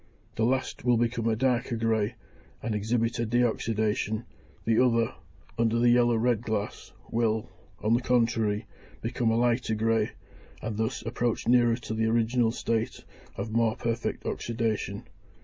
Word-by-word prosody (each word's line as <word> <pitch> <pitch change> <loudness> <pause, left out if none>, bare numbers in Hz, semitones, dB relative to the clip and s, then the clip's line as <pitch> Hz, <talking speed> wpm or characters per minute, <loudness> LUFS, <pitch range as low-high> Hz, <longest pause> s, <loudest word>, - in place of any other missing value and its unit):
The 110 - +1
last 130 0 -1
will 120 -1 +4
become 115 0 0
a 115 - +2
darker 125 0 +1
grey, 110 -2 0 0.5
and 115 0 -1
exhibit 115 +3 0
a 115 - +1
de 120 +2 +2
oxydation; 110 -1 0 0.4
the 115 +2 +4
other, 115 -2 +2 0.5
under 115 0 +2
the 120 0 +4
yellow 120 -1 +4
red 115 -1 +2
glass, 110 -3 -3 0.2
will, 110 -2 0 0.3
on 110 +2 +3
the 120 - +3
contrary, 115 -4 +1 0.4
become 120 0 0
a 115 - +2
lighter 120 -1 +1
grey, 110 0 +1 0.5
and 110 0 -4
thus 110 0 -1
approach 115 +1 -1
nearer 120 -1 +5
to 115 -2 -6
the 110 0 +1
original 115 +1 +2
state 115 -1 -2 0.3
of 110 - -4
more 115 -1 +2
perfect 115 0 -2
oxydation. 115 -2 -2
115 Hz, 150 wpm, -28 LUFS, 110-120 Hz, 0.5 s, nearer